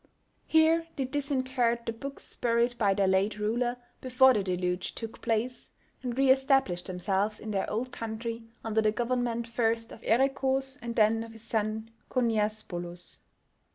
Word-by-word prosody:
Here 320 +1 +4
they 270 - -1
disinterred 260 -4 0
the 230 - -2
books 275 +5 -7
buried 235 +1 +1
by 200 -3 +3
their 195 - +2
late 195 +3 +2
ruler 240 +4 0 0.2
before 260 +1 +5
the 210 - +1
Deluge 180 -1 -2
took 225 -1 -7
place, 230 +2 -1 0.3
and 245 -1 -4
re 270 -1 +5
established 265 -9 +2
themselves 195 +3 -1
in 220 - -6
their 195 -2 -1
old 245 +4 -2
country 230 +1 -4 0.2
under 220 0 +1
the 215 -1 +3
government 235 +1 -1
first 230 -1 0
of - - -11
Erekhoos, 265 +3 +1
and 235 -1 -5
then 225 +1 +3
of 230 0 -10
his 225 0 -12
son 220 0 -2 0.2
Khoniasbolos. 210 -7 -1
230 Hz, 155 wpm, -29 LUFS, 215-255 Hz, 0.3 s, before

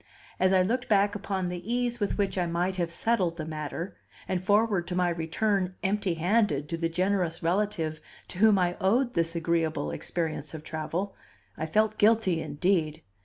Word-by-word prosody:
As 185 0 +4
I 185 -1 +5
looked 245 +6 -1
back 205 -1 +4
upon 195 -3 -2
the 175 -1 -5
ease 240 0 0
with 205 - -1
which 200 -2 0
I 180 -2 0
might 175 +3 -1
have 170 -2 0
settled 185 -4 +1
the 155 - -4
matter, 160 +4 -5 0.3
and 185 -1 -1
forward 205 -2 +2
to 180 - -3
my 180 -1 +2
return 185 +3 0
empty 195 -2 0
handed 175 -4 +1
to 165 - -2
the 165 0 -1
generous 180 -1 0
relative 165 -3 0 0.3
to 180 - -6
whom 215 -1 +6
I 175 -1 +1
owed 240 +6 +2
this 165 0 0
agreeable 165 - 0
experience 155 - -3
of 155 - -8
travel, 165 +5 -3 0.4
I 160 - -3
felt 215 +6 +1
guilty 210 -6 +3
indeed. 160 -1 0
180 Hz, 175 wpm, -28 LUFS, 165-205 Hz, 0.4 s, whom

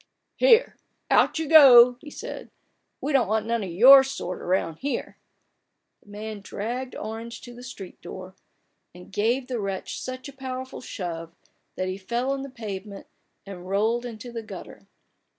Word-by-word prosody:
" - - -53
Here, - - +4 0.3
out - - +4
you 320 -1 -2
go! 250 -6 +9
" - - -44
he 300 - -10
said. - - -8 0.3
" - - -50
We 290 - -2
don't 260 -6 +3
want 215 +1 0
none 230 0 -1
of 190 - -5
your 260 +10 +8
sort 185 -9 -5
around 175 -3 -1
here! 280 +7 -4 0.4
" - - -53
The - - -21
man 210 0 -7
dragged 240 +6 -5
Orange 225 +2 -6
to 245 - -11
the 240 - -12
street 225 -7 -10
door, 185 +2 -9 0.6
and 180 +1 -13
gave 235 +6 +1
the 250 -2 -4
wretch 195 -2 -4
such 255 +1 -6
a 280 - -10
powerful 260 -1 -6
shove, 170 -7 -6 0.4
that 185 - -2
he 185 +1 -4
fell 240 +7 -2
on 275 0 -2
the 275 - -7
pavement, 205 -5 -7 0.4
and 185 -2 -9
rolled 220 +5 +1
into 240 0 -8
the 230 -1 -5
gutter. 215 - -11
230 Hz, 180 wpm, -25 LUFS, 195-255 Hz, 0.6 s, go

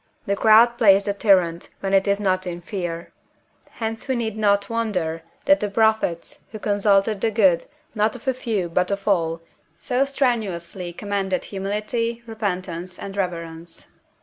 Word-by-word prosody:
The 200 - 0
crowd 230 +3 +5
plays 200 -3 +6
the 200 - -1
tyrant, 185 -5 +2
when 195 0 -2
it 195 +1 +4
is 200 0 +2
not 185 -2 0
in 175 -1 -4
fear; 175 -3 -5 0.6
hence 225 +1 -5
we 260 - 0
need 225 -3 -2
not 200 -2 +2
wonder 185 -8 -2 0.2
that 290 +1 +5
the 210 - -2
prophets, 220 -5 0
who 215 - -6
consulted 205 0 +2
the 225 - +2
good, 195 -6 +3 0.3
not 215 +1 +1
of 250 +2 -12
a 265 - +3
few, 225 -8 -2
but 180 +2 0
of 200 +1 -3
all, 165 -4 +1 0.4
so 255 +1 0
strenuously 205 -10 -2
commended 195 0 -2
Humility, 215 +4 -3
Repentance, 185 -5 -4
and 195 0 -7
Reverence. 170 -3 -5
200 Hz, 155 wpm, -23 LUFS, 180-220 Hz, 0.6 s, plays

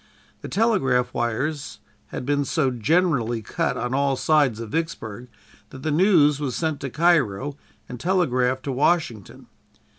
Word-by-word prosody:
The - - -6
telegraph 135 - +1
wires 135 +6 -2 0.3
had - - -6
been 145 +1 +1
so 135 -1 0
generally 125 -3 +1
cut - - -2
on 125 +1 -3
all 140 0 +1
sides 140 -5 +2
of 115 -2 -7
Vicksburg 125 - -4 0.4
that 130 0 -11
the 155 - -1
news 150 -4 +4
was 135 -5 -3
sent 160 -4 -2
to 140 - -4
Cairo 145 - +1 0.3
and 125 - -8
telegraphed 130 -8 +1
to 140 - -3
Washington. 130 - -1
135 Hz, 145 wpm, -23 LUFS, 125-160 Hz, 0.4 s, news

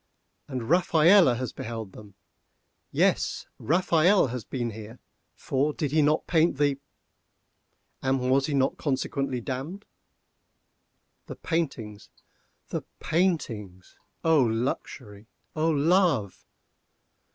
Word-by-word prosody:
And 130 -4 -4
Rafaelle 170 -2 +5
has 125 -2 -4
beheld 115 -3 -6
them! 100 0 -14 0.8
Yes, - - +1
Rafaelle 175 - +3
has 125 -3 -5
been 120 -3 -4
here, 110 +2 -10 0.4
for 140 +3 -1
did 145 -3 -3
he 155 +1 +3
not 150 +2 +2
paint 165 -3 +2
the—? 145 -1 +1 1.2
and 135 0 +1
was 135 +1 +3
he 150 - -1
not 135 0 +1
consequently 135 -2 -2
damned? 140 - -5 1.4
The - - -7
paintings—the 125 - -6 0.2
paintings! 115 - -2 0.3
O 160 -2 +4
luxury! 115 -2 -3 0.3
O 160 +1 +1
love! 155 - +1
135 Hz, 100 wpm, -26 LUFS, 115-160 Hz, 1.4 s, Rafaelle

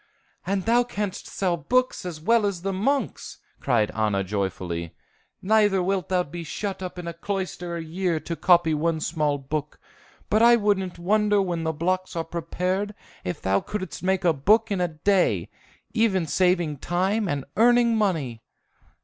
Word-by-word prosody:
"And 195 -1 -1
thou 240 +2 +4
canst 210 -5 -4
sell 185 -3 -1
books 255 - 0
as 165 -3 -6
well 225 +5 +3
as 185 -3 -4
the 195 0 -1
monks!" 270 +9 -1 0.2
cried 115 -6 +1
Anna 105 -3 0
joyfully. 90 -4 -3 0.5
"Neither 205 -2 +3
wilt 190 0 -1
thou 180 -1 +2
be 170 +2 -7
shut 195 +5 -4
up 185 -1 -6
in 175 -1 -6
a 170 - -4
cloister 180 -1 -4
a 165 - -4
year 170 0 -1
to 170 - -4
copy 170 -2 +4
one 160 +1 0
small 150 -3 0
book; 150 +2 -5 0.5
but 215 - +2
I 235 +1 +7
wouldn't 200 -5 0
wonder 210 +3 +2
when 175 -4 -1
the 160 - +1
blocks 185 +4 -2
are 165 - -1
prepared, 180 +5 -2 0.3
if 90 - -5
thou 95 +1 +2
couldst 205 -3 -5
make 190 0 0
a 170 - +5
book 215 +10 +3
in 195 -2 0
a 175 - +2
day, 180 +4 +1 0.4
even 205 -6 +2
saving 175 -3 +1
time 190 +5 0
and 140 -2 -2
earning 235 0 +4
money!" 160 - -1
180 Hz, 165 wpm, -25 LUFS, 160-205 Hz, 0.5 s, I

